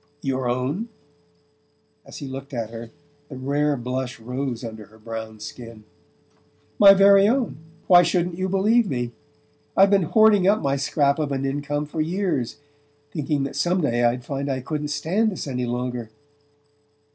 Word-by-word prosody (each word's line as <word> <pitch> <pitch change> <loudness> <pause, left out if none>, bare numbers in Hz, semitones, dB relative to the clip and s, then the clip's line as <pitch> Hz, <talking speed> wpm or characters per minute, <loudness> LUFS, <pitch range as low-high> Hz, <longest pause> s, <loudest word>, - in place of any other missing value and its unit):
"Your 130 -2 -1
own?" 135 - -2 1.2
As - - -10
he 140 - -7
looked 135 +1 -7
at 115 -2 -4
her 115 0 -8 0.4
the 140 - -8
rare 140 +2 0
blush 125 +1 -4
rose 125 +1 -4
under 110 -2 -7
her 110 - -19
brown 110 0 -7
skin. 115 0 -10 1.0
"My 195 -1 +9
very 195 0 +6
own. 245 - 0 0.3
Why 175 -1 +7
shouldn't 175 0 0
you 190 0 -1
believe 210 +4 +2
me? 120 -3 -2 0.7
I've 195 +1 +6
been 200 -1 +4
hoarding 215 -4 +5
up 210 +2 +4
my 140 -1 0
scrap 140 +1 +1
of 150 -2 -1
an 135 0 -2
income 145 +2 -2
for 155 +1 -3
years, 170 - -1 0.5
thinking 150 -2 -1
that 140 - -5
some 180 +1 +1
day 120 -5 +1
I'd 120 +1 +1
find 140 0 -3
I 130 -1 -2
couldn't 150 +2 -3
stand 170 +10 0
this 185 - -5
any 125 -3 -3
longer..." 120 -1 -3
140 Hz, 160 wpm, -23 LUFS, 125-180 Hz, 1.2 s, My